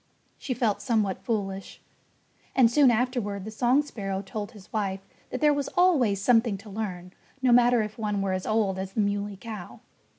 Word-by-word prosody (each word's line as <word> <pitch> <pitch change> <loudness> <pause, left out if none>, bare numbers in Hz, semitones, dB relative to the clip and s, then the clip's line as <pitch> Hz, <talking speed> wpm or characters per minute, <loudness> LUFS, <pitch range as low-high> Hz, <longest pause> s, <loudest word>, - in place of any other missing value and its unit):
She 255 - -3
felt 220 -5 0
somewhat 215 -6 0
foolish. 195 -4 -3 0.8
And 240 -3 +5
soon 275 +1 +6
afterward 230 -5 -1
the 220 - -6
song 245 +6 +2
sparrow 195 -8 -4
told 210 +3 -6
his 205 -3 -15
wife 195 -3 -2 0.2
that 255 - -5
there 300 -1 +5
was 285 -1 -2
always 275 - +4
something 225 -1 +3
to 205 +2 -12
learn, 185 -4 -5 0.3
no 255 - +4
matter 240 -1 +5
if 215 +2 -7
one 210 -2 -1
were 190 -1 0
as 185 0 -3
old 210 -4 +1
as 190 0 -5
the 215 - +1
Muley 205 0 -1
Cow. 210 -4 -8
215 Hz, 185 wpm, -27 LUFS, 195-245 Hz, 0.8 s, soon